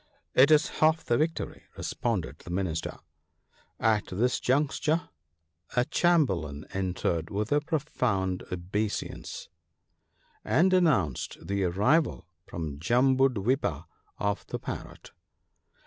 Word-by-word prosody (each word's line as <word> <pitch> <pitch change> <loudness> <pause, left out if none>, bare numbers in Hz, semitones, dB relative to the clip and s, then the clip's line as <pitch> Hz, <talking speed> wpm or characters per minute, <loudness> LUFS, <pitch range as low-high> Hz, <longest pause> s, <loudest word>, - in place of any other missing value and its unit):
" - - -49
It 140 - +5
is 155 -1 +3
half 160 +1 +3
the 120 - +2
victory," 155 +3 -2
responded 110 -9 -2
the - - -12
Minister. 90 -3 -2 0.8
At 110 -2 +2
this 120 +7 0
juncture 155 +5 +1 0.7
a 125 0 +3
chamberlain 95 - +1
entered 90 -3 -1
with 105 +2 -2
a 145 0 +3
profound 125 - -1
obeisance, 100 +4 -3 1.0
and 185 +3 +3
announced 135 - +2
the 100 -1 0
arrival 105 - +2 0.2
from 75 -4 -5
Jambudwipa 125 - +2 0.3
of 100 0 -1
the - - -3
Parrot. - - -8
110 Hz, 105 wpm, -28 LUFS, 90-150 Hz, 1.0 s, It